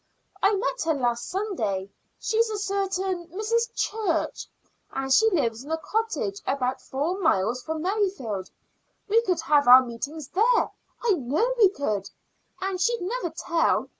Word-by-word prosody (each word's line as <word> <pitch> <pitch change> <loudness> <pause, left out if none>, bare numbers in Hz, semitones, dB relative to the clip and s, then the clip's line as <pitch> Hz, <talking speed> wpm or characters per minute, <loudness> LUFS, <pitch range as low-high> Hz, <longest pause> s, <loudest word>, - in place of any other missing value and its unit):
I 400 +2 +4
met - - -1
her 320 -1 +2
last 240 -3 -1
Sunday. 220 - -2 0.3
She's 455 0 +1
a 430 - -3
certain 390 -3 -2
Mrs. 450 +6 -1
Church, 410 -7 -1 0.4
and 270 0 0
she 445 +7 +6
lives 250 - 0
in 290 - -11
a 320 - 0
cottage 320 - -2
about 260 -1 -1
four 310 +8 -2
miles 245 - +1
from 315 +3 -4
Merrifield. 365 - -1 0.6
We 445 +3 +4
could 365 -7 0
have 295 -4 +3
our 255 +1 +9
meetings 280 +5 -6
there 460 +5 +3 0.3
I 475 - +3
know 330 - +1
we 435 -6 +6
could 215 - -2 0.5
and 380 -1 -2
she'd 470 +2 +1
never 405 -1 -2
tell. 335 0 0
345 Hz, 150 wpm, -26 LUFS, 265-420 Hz, 0.6 s, our